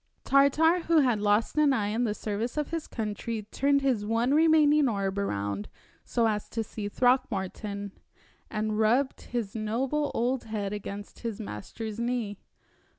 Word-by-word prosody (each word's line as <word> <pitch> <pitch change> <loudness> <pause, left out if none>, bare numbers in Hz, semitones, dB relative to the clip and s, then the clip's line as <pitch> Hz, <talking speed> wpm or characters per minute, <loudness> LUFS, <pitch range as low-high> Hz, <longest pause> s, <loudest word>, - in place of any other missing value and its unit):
Tartar, 300 +5 +4
who 325 -2 +5
had 245 -6 +2
lost 210 +2 +2
an 295 -2 +5
eye 205 -5 0
in 230 +3 0
the 210 -2 -1
service 220 +6 -3
of 300 0 -1
his 330 -2 -3
country, 220 0 -4
turned 280 +1 +2
his 255 -6 +1
one 230 +5 +1
remaining 305 -2 +5
orb 200 -2 -1
around 100 - -2 0.3
so 235 -2 +1
as 210 -1 -2
to 225 - -2
see 210 -1 -5
Throckmorton, 205 -5 0 0.6
and 215 0 -2
rubbed 245 +5 +2
his 235 -5 -4
noble 255 +7 -1
old 245 +2 0
head 210 -2 -3
against 205 0 -7
his 230 -3 -4
master's 215 - -6
knee. 235 -4 -2
225 Hz, 155 wpm, -28 LUFS, 205-265 Hz, 0.6 s, who